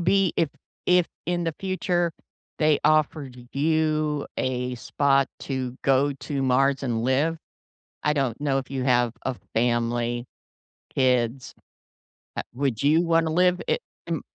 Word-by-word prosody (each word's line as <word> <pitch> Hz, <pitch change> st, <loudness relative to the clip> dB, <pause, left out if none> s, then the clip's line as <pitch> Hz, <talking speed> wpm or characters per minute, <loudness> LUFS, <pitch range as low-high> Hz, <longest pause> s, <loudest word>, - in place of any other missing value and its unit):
be 190 Hz, +1 st, +3 dB
if 165 Hz, -, +2 dB, 0.4 s
if 180 Hz, -1 st, +4 dB, 0.2 s
in 175 Hz, 0 st, 0 dB
the 165 Hz, -2 st, -1 dB
future 180 Hz, -3 st, 0 dB, 0.5 s
they 155 Hz, -1 st, +4 dB
offered 150 Hz, -3 st, +2 dB, 0.2 s
you 155 Hz, 0 st, +1 dB
a 125 Hz, -1 st, -1 dB
spot 135 Hz, +2 st, +2 dB
to 130 Hz, -2 st, -3 dB
go 135 Hz, +1 st, +3 dB
to 140 Hz, 0 st, -4 dB
Mars 135 Hz, +1 st, +2 dB
and 120 Hz, -4 st, -1 dB
live? 140 Hz, +6 st, +1 dB, 0.7 s
I 150 Hz, -, +3 dB
don't 135 Hz, -5 st, -1 dB
know 140 Hz, -2 st, +1 dB
if 135 Hz, -, -6 dB
you 135 Hz, -2 st, -2 dB
have 120 Hz, -2 st, +3 dB
a 130 Hz, -, -2 dB, 0.2 s
family, 120 Hz, +1 st, 0 dB, 0.7 s
kids. 125 Hz, -1 st, +1 dB, 0.8 s
Uh, -, -, +1 dB
would 130 Hz, -3 st, -1 dB
you 150 Hz, +4 st, +4 dB
wanna 165 Hz, -1 st, +3 dB
live 180 Hz, +2 st, +3 dB
i -, -, +3 dB, 0.3 s
m -, -, -2 dB
140 Hz, 140 wpm, -25 LUFS, 125-160 Hz, 0.8 s, if